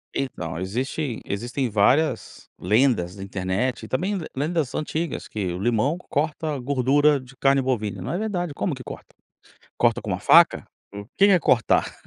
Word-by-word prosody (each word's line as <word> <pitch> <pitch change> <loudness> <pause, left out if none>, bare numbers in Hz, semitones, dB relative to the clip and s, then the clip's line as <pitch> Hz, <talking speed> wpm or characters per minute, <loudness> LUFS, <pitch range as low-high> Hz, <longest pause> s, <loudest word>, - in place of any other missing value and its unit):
Então 85 -11 -4
existe 125 - -3
existem 120 +5 -3
várias 120 +6 +1
lendas 105 -3 +2
na 95 - -8
internet, 95 +6 -2
e - - -7
também 190 +9 -1 0.2
lendas 150 0 -1
antigas 155 +1 -3
que 105 -3 -4
o - - -4
limão 120 - +1
corta 150 0 -1
gordura 140 +3 +2
de 130 +1 -15
carne 135 0 +3
bovina. 110 -7 -2
Não 125 - -4
é 175 - -1
verdade 180 -7 -2
como 150 +1 -2
que 130 - -10
corta? - - -10 0.6
Corta - - +2
com - - -6
uma - - -2
faca, - - +5 0.3
o 100 0 -7
que 195 - +6
que 200 - +5
é 185 - +5
cortar? 115 -8 +2
130 Hz, 170 wpm, -24 LUFS, 105-150 Hz, 0.6 s, que